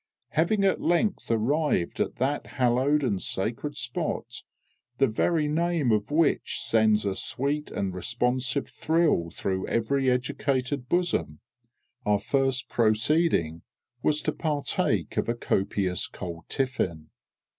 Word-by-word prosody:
Having 195 Hz, +6 st, +1 dB
at 195 Hz, -, +2 dB
length 175 Hz, +5 st, +1 dB
arrived 115 Hz, -, +1 dB
at -, -, -1 dB
that 140 Hz, +3 st, -1 dB
hallowed 130 Hz, +4 st, +2 dB
and 100 Hz, -8 st, 0 dB
sacred 120 Hz, +9 st, -2 dB
spot, 120 Hz, -2 st, -3 dB, 0.6 s
the 135 Hz, -, +4 dB
very 150 Hz, +6 st, +1 dB
name 160 Hz, -3 st, +1 dB
of 105 Hz, +1 st, +1 dB
which 155 Hz, +1 st, +1 dB
sends 110 Hz, -2 st, +3 dB
a 100 Hz, -, 0 dB
sweet 140 Hz, +7 st, -2 dB
and 100 Hz, -2 st, -3 dB
responsive 125 Hz, +6 st, 0 dB
thrill 160 Hz, -, +1 dB
through 95 Hz, +2 st, -3 dB
every 130 Hz, +3 st, +1 dB
educated 125 Hz, +1 st, -1 dB
bosom, 90 Hz, -, 0 dB, 0.6 s
our 105 Hz, -1 st, +3 dB
first 130 Hz, +3 st, 0 dB
proceeding 110 Hz, -, +2 dB, 0.4 s
was 150 Hz, 0 st, +1 dB
to -, -, +1 dB
partake 150 Hz, -3 st, -1 dB
of -, -, 0 dB
a 120 Hz, -, +1 dB
copious 95 Hz, -4 st, 0 dB
cold 85 Hz, -3 st, -7 dB
tiffin. 95 Hz, -, -2 dB
125 Hz, 125 wpm, -27 LUFS, 105-150 Hz, 0.6 s, the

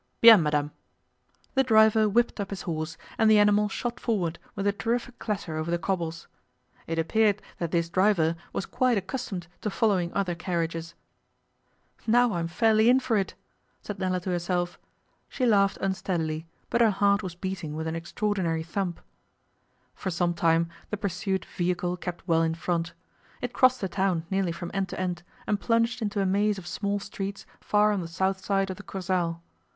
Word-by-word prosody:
'Bien, 225 Hz, -5 st, +10 dB
madame!' 150 Hz, -1 st, 0 dB, 0.8 s
The 265 Hz, -, +4 dB
driver 220 Hz, -2 st, +5 dB
whipped 235 Hz, +2 st, +1 dB
up 200 Hz, -1 st, -3 dB
his 200 Hz, -, -5 dB
horse, 160 Hz, -1 st, -3 dB, 0.2 s
and 220 Hz, -, +5 dB
the 215 Hz, -, +7 dB
animal 210 Hz, 0 st, +4 dB
shot 240 Hz, +4 st, -3 dB
forward 180 Hz, -8 st, -1 dB, 0.2 s
with 200 Hz, -, -3 dB
a 200 Hz, -, +4 dB
terrific 235 Hz, +3 st, -2 dB
clatter 190 Hz, -7 st, -3 dB
over 155 Hz, +1 st, -2 dB
the 175 Hz, -, +1 dB
cobbles. 170 Hz, -2 st, -3 dB, 0.6 s
It 165 Hz, -, -2 dB
appeared 210 Hz, +5 st, +2 dB, 0.2 s
that 170 Hz, -, -1 dB
this 170 Hz, 0 st, +1 dB
driver 170 Hz, -3 st, +2 dB, 0.2 s
was -, -, -3 dB
quite 255 Hz, -3 st, +1 dB
accustomed 190 Hz, -2 st, -4 dB, 0.2 s
to 210 Hz, -, -1 dB
following 195 Hz, -5 st, +1 dB
other 195 Hz, -3 st, 0 dB
carriages. 170 Hz, -2 st, -3 dB, 1.1 s
'Now 240 Hz, 0 st, +4 dB
I 175 Hz, -, -1 dB
am 165 Hz, -, -1 dB
fairly 220 Hz, +5 st, +4 dB
in 255 Hz, +1 st, +6 dB
for 245 Hz, -3 st, 0 dB
it!' 195 Hz, -2 st, 0 dB, 0.5 s
said 210 Hz, -2 st, -6 dB
Nella 185 Hz, -1 st, 0 dB
to 185 Hz, -, -3 dB
herself. 175 Hz, 0 st, -1 dB, 0.5 s
She 255 Hz, -, -1 dB
laughed 200 Hz, -4 st, +3 dB
unsteadily, 165 Hz, -4 st, -2 dB, 0.2 s
but 235 Hz, -, +2 dB
her 230 Hz, -, +6 dB
heart 200 Hz, 0 st, +3 dB
was 180 Hz, -4 st, -6 dB
beating 180 Hz, -4 st, -4 dB
with 160 Hz, +1 st, -3 dB
an 160 Hz, 0 st, -2 dB
extraordinary 170 Hz, -1 st, -1 dB
thump. 175 Hz, +1 st, -3 dB, 0.9 s
For 190 Hz, -, -4 dB
some 175 Hz, 0 st, 0 dB
time 165 Hz, 0 st, +2 dB, 0.2 s
the 210 Hz, -, -2 dB
pursued 190 Hz, -1 st, -2 dB
vehicle 180 Hz, 0 st, -1 dB
kept 180 Hz, -1 st, -7 dB
well 165 Hz, -2 st, +3 dB
in 165 Hz, 0 st, +1 dB
front. 170 Hz, 0 st, -2 dB, 0.5 s
It 245 Hz, -1 st, -4 dB
crossed 255 Hz, 0 st, +4 dB
the 190 Hz, -, 0 dB
town 185 Hz, -3 st, 0 dB
nearly 190 Hz, -2 st, +1 dB
from 170 Hz, +1 st, -6 dB
end 195 Hz, -1 st, -1 dB
to -, -, -6 dB
end, 180 Hz, -2 st, -2 dB, 0.2 s
and 205 Hz, -, 0 dB
plunged 230 Hz, +1 st, +1 dB
into 205 Hz, -2 st, -1 dB
a -, -, +1 dB
maze 205 Hz, +2 st, +2 dB
of 190 Hz, -, -9 dB
small 200 Hz, +2 st, -2 dB
streets 195 Hz, 0 st, -6 dB
far 210 Hz, 0 st, +3 dB
on 200 Hz, -3 st, 0 dB
the 170 Hz, -, -5 dB
south 190 Hz, +3 st, -1 dB
side 195 Hz, -1 st, +1 dB
of 185 Hz, -, -7 dB
the 205 Hz, -, -10 dB
Kursaal. 180 Hz, -4 st, -2 dB
190 Hz, 180 wpm, -27 LUFS, 170-210 Hz, 1.1 s, Bien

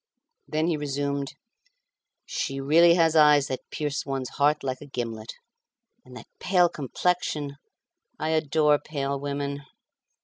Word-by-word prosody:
Then 155 Hz, +1 st, 0 dB
he 165 Hz, -2 st, +1 dB
resumed, 140 Hz, -1 st, -3 dB, 0.9 s
"She 135 Hz, -2 st, -3 dB
really 165 Hz, +5 st, +5 dB
has 165 Hz, -2 st, +3 dB
eyes 150 Hz, -2 st, +6 dB
that 130 Hz, -, -5 dB
pierce 145 Hz, -2 st, -3 dB
one's 135 Hz, -2 st, -3 dB
heart 150 Hz, +1 st, +1 dB
like 130 Hz, -1 st, -3 dB
a 145 Hz, -, -10 dB
gimlet. 115 Hz, -4 st, -5 dB, 0.7 s
And 125 Hz, -, -12 dB
that 115 Hz, -, -11 dB
pale 180 Hz, -2 st, +3 dB
complexion! 150 Hz, -1 st, -2 dB, 0.6 s
I 155 Hz, -, -2 dB
adore 155 Hz, -1 st, +3 dB
pale 140 Hz, -2 st, -3 dB
women!" 140 Hz, 0 st, -3 dB
145 Hz, 130 wpm, -26 LUFS, 135-155 Hz, 0.9 s, eyes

